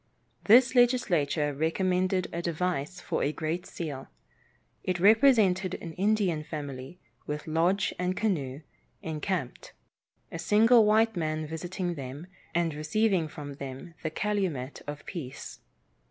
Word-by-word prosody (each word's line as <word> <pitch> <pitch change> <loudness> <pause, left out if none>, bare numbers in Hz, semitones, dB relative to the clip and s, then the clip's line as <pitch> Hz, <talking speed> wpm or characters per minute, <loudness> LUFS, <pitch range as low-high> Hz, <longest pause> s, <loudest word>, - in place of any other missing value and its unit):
This 240 +4 +6
legislature 175 - +2
recommended 185 +4 0
a 170 - -2
device 170 -1 -2
for - - -2
a 145 - +1
great 160 +4 -3
seal. 145 -6 -6 0.8
It 180 -1 -1
represented 200 -4 +4
an 165 -2 -7
Indian 190 -4 +1
family 145 0 -7 0.3
with 150 0 -4
lodge 170 +5 +1
and 180 +1 -1
canoe, 150 -10 -1 0.4
encamped; 160 -3 -4 0.6
a 165 - -5
single 220 +5 +5
white 220 +1 +4
man 155 -2 -2
visiting 175 +3 -4
them, 140 +1 -7 0.3
and 170 -2 +1
receiving 170 +3 +1
from 145 -1 -8
them 140 +5 -8
the 160 - -2
calumet 170 -8 -2
of 145 0 -6
peace. 150 -9 -7
170 Hz, 125 wpm, -28 LUFS, 150-195 Hz, 0.8 s, This